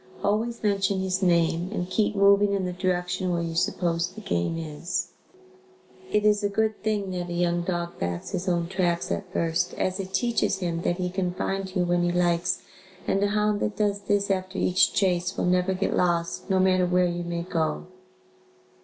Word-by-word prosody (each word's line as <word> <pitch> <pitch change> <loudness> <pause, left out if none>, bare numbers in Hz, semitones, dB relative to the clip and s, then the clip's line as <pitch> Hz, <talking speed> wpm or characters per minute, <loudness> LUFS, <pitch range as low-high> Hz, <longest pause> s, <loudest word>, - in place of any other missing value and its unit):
Always 225 +3 0
mention 200 -2 +1
his 190 0 -1
name 170 -1 +2
and 180 -4 -2
keep 210 +3 0
moving 200 0 +5
in 195 -2 0
the 180 - -3
direction 180 0 -1
where 170 -1 0
you 165 -1 -3
suppose 170 0 0
the 195 - -10
game 85 - -1
is. 160 +1 -3 1.0
It 210 0 +2
is 210 0 +3
a 205 - +2
good 220 +1 0
thing 210 -3 -1
that 180 -1 -4
a - - -3
young 175 0 +1
dog 175 -1 -3
backs 85 0 -3
his 185 -1 -2
own 170 -1 0
tracks 175 -2 0
at 190 -2 -3
first, 170 0 0
as 185 +1 -1
it 190 -1 -5
teaches 210 0 +1
him 170 -3 -2
that 175 - 0
he 180 -1 -2
can 180 -1 -2
find 195 0 -3
you 180 - +2
when 175 0 +1
he 175 0 +1
likes 175 0 +1 0.4
and 195 - +1
a 205 - +3
hound 210 0 +1
that 210 - -2
does 205 -1 0
this 200 0 +1
after 190 0 -2
each 185 0 +3
chase 180 -1 +1
will - - 0
never 180 +1 +2
get 195 +1 -1
lost 170 -1 0
no 190 - +3
matter 185 -1 +3
where 180 0 +3
you 175 0 -2
may 170 0 -3
go. 160 -3 -1
185 Hz, 200 wpm, -26 LUFS, 175-200 Hz, 1.0 s, moving